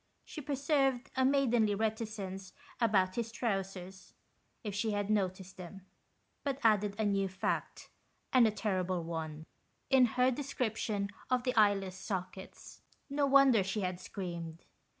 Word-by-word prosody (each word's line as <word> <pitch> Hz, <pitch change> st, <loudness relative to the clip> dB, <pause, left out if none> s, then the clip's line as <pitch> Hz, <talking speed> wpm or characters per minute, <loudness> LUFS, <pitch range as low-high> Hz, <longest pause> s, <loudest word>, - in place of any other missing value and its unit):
She 305 Hz, -, -7 dB
preserved 275 Hz, -2 st, 0 dB
a 260 Hz, -, +2 dB
maidenly 245 Hz, -6 st, +3 dB
reticence 215 Hz, -3 st, -3 dB, 0.3 s
about 195 Hz, -5 st, +2 dB
his 230 Hz, -1 st, -2 dB
trousers, 195 Hz, -4 st, -4 dB, 0.5 s
if 210 Hz, -3 st, -4 dB
she 215 Hz, +2 st, -1 dB
had 205 Hz, 0 st, -1 dB
noticed 190 Hz, -2 st, -1 dB
them; 185 Hz, +1 st, -10 dB, 0.6 s
but 275 Hz, -2 st, -1 dB
added 210 Hz, -2 st, +3 dB
a 220 Hz, -, 0 dB
new 195 Hz, -1 st, +1 dB
fact, 190 Hz, +1 st, -3 dB, 0.4 s
and 250 Hz, -3 st, +7 dB
a -, -, +1 dB
terrible 185 Hz, -4 st, -1 dB
one, 160 Hz, -2 st, -5 dB, 0.5 s
in 260 Hz, -1 st, +7 dB
her 255 Hz, +1 st, +5 dB
description 225 Hz, -6 st, -2 dB, 0.2 s
of 250 Hz, -1 st, +2 dB
the 250 Hz, -1 st, -1 dB
eyeless 195 Hz, -3 st, +3 dB
sockets. 190 Hz, -2 st, -6 dB, 0.3 s
No 285 Hz, 0 st, +2 dB
wonder 270 Hz, -6 st, +6 dB
she 195 Hz, +3 st, -2 dB
had 180 Hz, -1 st, -2 dB
screamed. 170 Hz, -4 st, -6 dB
210 Hz, 135 wpm, -33 LUFS, 190-245 Hz, 0.6 s, and